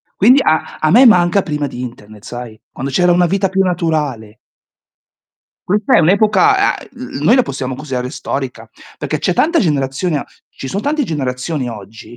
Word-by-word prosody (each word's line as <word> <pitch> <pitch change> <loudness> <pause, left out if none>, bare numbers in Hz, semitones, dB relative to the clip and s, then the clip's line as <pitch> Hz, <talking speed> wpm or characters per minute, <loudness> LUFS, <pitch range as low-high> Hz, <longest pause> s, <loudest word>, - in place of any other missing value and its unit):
Quindi 250 +8 +5
a 155 0 0
a 155 - +1
me 250 +5 +7
manca 180 -2 +4
prima 150 -3 -3
di 125 -2 -7
internet 110 -4 -10
sai. 120 -3 -8
Quando 135 +1 -5
c'era 180 +5 +3
una 175 0 +3
vita 195 +2 0
più 195 0 +1
naturale. 150 - -2 1.3
Questa 205 +2 +1
è - - +5
un'epoca 215 - +3
a - - -12
uhm, 245 - -7
noi 230 - +5
la 255 - +4
possiamo 130 - -4
considerare 130 -3 -4
storica, 125 -5 -5 0.3
perché 150 +1 -3
c'è 180 - 0
tanta 330 - +2
generazione 145 0 -1 0.2
ci 135 - -9
son 200 - -3
tante 295 +3 -1
generazioni 135 - -3
oggi 110 +2 -11
155 Hz, 170 wpm, -16 LUFS, 125-195 Hz, 1.3 s, me